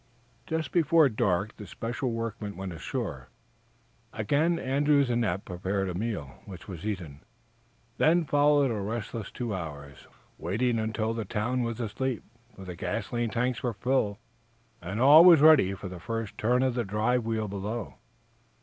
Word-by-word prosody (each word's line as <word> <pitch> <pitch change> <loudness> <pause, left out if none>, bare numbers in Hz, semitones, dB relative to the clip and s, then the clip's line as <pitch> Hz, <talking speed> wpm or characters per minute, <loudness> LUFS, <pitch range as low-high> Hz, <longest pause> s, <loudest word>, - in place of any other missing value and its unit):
Just 160 -4 -2
before 165 -3 +4
dark 105 -2 0
the 105 - -9
special 120 +2 -3
workmen 115 -3 -4
went 95 -2 -5
ashore. 80 - -5 0.8
Again 145 +10 +1
Andrews 140 -1 +2
and 120 0 +1
Eph 95 -3 -2
prepared 95 +2 -2
a - - -3
meal, 95 - -4
which 95 -3 -10
was 95 0 -6
eaten. 85 -8 -5 0.8
Then 165 +1 +4
followed 145 -2 +3
a 105 -3 -2
restless 110 0 -4
two 120 -4 -4
hours, 75 -6 -7 0.3
waiting 115 +7 0
until 110 0 -1
the 115 -1 -3
town 120 +5 -1
was 115 -1 -3
asleep, 120 +2 -3 0.3
for 95 - -10
the 90 -1 -7
gasoline 115 +5 -2
tanks 120 +2 -1
were 120 -2 -1
filled, 110 -2 0 0.6
and 95 +5 -4
all 145 +6 +9
was 175 -3 +8
ready 140 -11 +6
for 95 - -7
the 90 -1 -8
first 115 +2 -4
turn 125 +5 +2
of 130 -2 +1
the 120 -1 -1
drive 110 +4 0
wheel 110 -1 -2
below. 105 +3 -5
115 Hz, 160 wpm, -28 LUFS, 100-125 Hz, 0.8 s, all